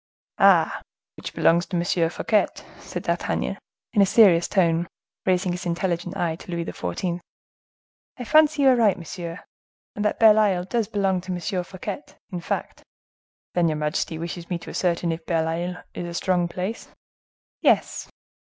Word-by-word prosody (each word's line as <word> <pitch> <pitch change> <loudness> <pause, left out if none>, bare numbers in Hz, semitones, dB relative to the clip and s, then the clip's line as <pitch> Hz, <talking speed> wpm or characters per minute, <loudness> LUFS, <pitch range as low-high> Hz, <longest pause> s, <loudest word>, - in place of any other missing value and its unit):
"Ah! - - +5 0.3
which - - -8
belongs 170 +1 +3
to 180 - -2
M. 170 -1 +1
Fouquet!" 210 +4 +1 0.3
said - - -6
D'Artagnan, - - -1 0.3
in 210 - +4
a - - +7
serious 185 -6 +6
tone, 170 -3 +2 0.4
raising 185 0 +2
his 180 0 -4
intelligent 175 +1 -2
eye 170 -3 0
to - - -14
Louis 170 -1 -2
XIV. 175 0 -3 1.0
"I 250 - -5
fancy 305 +2 +4
you 270 - +7
are 255 - +6
right, 220 -5 +3
monsieur, 170 0 -7 0.5
and 210 - -2
that 210 - +1
Bell 220 -1 +7
Isle 195 -4 +2
does 215 +3 -1
belong 195 -3 0
to 185 +1 -6
M. 180 +1 -2
Fouquet, 185 +10 -6 0.3
in 180 -2 -4
fact." - - -4 0.7
"Then 175 -1 +2
your 155 -1 0
majesty 150 +1 -2
wishes 170 +1 -6
me 175 - -1
to - - -10
ascertain 170 -1 0
if 165 0 -6
Belle 165 -2 +1
Isle 175 +2 -3
is 175 - -5
a 170 - -6
strong 180 -1 +1
place?" 185 +6 -5 0.7
"Yes." - - +2
180 Hz, 165 wpm, -24 LUFS, 170-195 Hz, 1.0 s, a